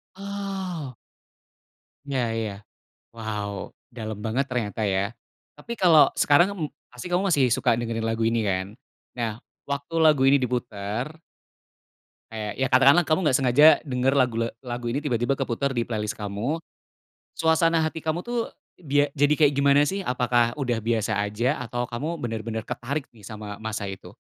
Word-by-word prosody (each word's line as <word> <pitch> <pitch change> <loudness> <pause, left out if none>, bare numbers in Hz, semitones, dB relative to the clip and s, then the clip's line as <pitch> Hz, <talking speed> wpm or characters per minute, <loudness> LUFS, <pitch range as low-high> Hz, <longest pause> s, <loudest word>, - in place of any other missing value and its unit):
Oh! 195 - -5 1.1
Iya, 130 -2 0 0.2
ya. 105 - -3 0.6
Wow, 105 -3 -5 0.2
dalam 110 -3 -6
banget 130 +5 0
ternyata, 110 -3 -2
ya? 100 +1 0 0.5
Tapi 235 - -7
kalau 170 -7 +6
sekarang, 160 +6 +4
m 185 - -9 0.3
pasti 125 +8 -8
kamu 185 +3 +1
masih 135 -6 +3
suka 125 -1 +3
dengerin 115 -1 -2
lagu 115 0 -1
ini, 115 0 +2
kan? 95 -1 0 0.5
Nah, 115 0 -3 0.2
waktu 140 +3 -4
lagu 155 -4 +5
ini 140 +1 +6
diputar 120 0 -3 1.2
kayak, 105 -2 -4
ya 130 0 0
katakanlah 140 +7 +6
kamu 155 +5 +1
nggak 130 -3 +4
sengaja 135 +5 +6 0.2
denger 135 -1 0
lagu 125 -4 +2
le 115 - +1 0.2
lagu 120 -1 -4
ini 140 +5 -2
tiba-tiba 125 0 0
keputar 135 +2 -2
di 120 - +1
playlist 105 -3 -3
kamu, 110 +11 -3 0.7
suasana 165 0 +2
hati 160 0 -1
kamu 160 +5 -2
tuh 240 -1 -2 0.2
dia 145 -3 +1
jadi 145 +1 +3
kayak 150 -2 +5
gimana, 140 +1 +4
sih? 195 +5 -2
Apakah 125 -4 +2
udah 120 -5 -1
biasa 115 -2 0
aja, 115 +7 0
atau 120 +1 -3
kamu 150 +9 -4
bener-bener 110 -1 -4
ketarik 140 +4 -3
nih 110 - -17
sama 105 0 -7
masa 110 -2 -3
itu? 95 -1 -9
125 Hz, 155 wpm, -25 LUFS, 115-150 Hz, 1.2 s, kalau